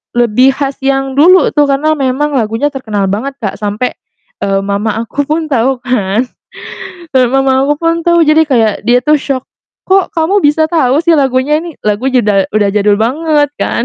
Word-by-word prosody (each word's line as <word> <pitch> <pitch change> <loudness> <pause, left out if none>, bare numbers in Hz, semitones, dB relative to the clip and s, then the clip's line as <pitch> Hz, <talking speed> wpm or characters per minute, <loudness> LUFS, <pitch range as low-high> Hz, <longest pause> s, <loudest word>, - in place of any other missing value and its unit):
lebih 240 +3 +3
khas 275 -1 -4
yang 270 0 -1
dulu 360 +1 +5
tuh, 290 -1 +2
karena 285 +3 +1
memang 270 +3 -1
lagunya 235 +3 -1
terkenal 215 -7 -3
banget 270 +7 -3
Kak, 200 - -4
sampe, 210 +4 -3 0.4
eee, 195 0 0
mama 200 +2 -2
aku 285 +4 -4
pun 310 0 -2
tau 255 0 0
kan, 230 -3 0 0.9
eee, 255 -1 +4
mama 270 0 +2
aku 290 +2 0
pun 330 0 -1
tuh, 340 0 +2
jadi 310 +1 +4
kayak 230 -8 +1
dia 240 +3 +3
tuh 300 +5 +1
syok 275 -3 -2 0.4
"Kok, 380 -2 +1
kamu 350 +6 +1
bisa 300 0 +2
tau 310 -6 +1
sih 340 - +3
lagunya 280 +1 +1
ini?" 335 -3 -9
Lagunya 245 +3 0
udah 195 -2 +1
udah 205 -1 +2
jadul 205 0 +2
banget 290 +6 0
kan. 235 - -1
270 Hz, 180 wpm, -12 LUFS, 225-300 Hz, 0.9 s, dulu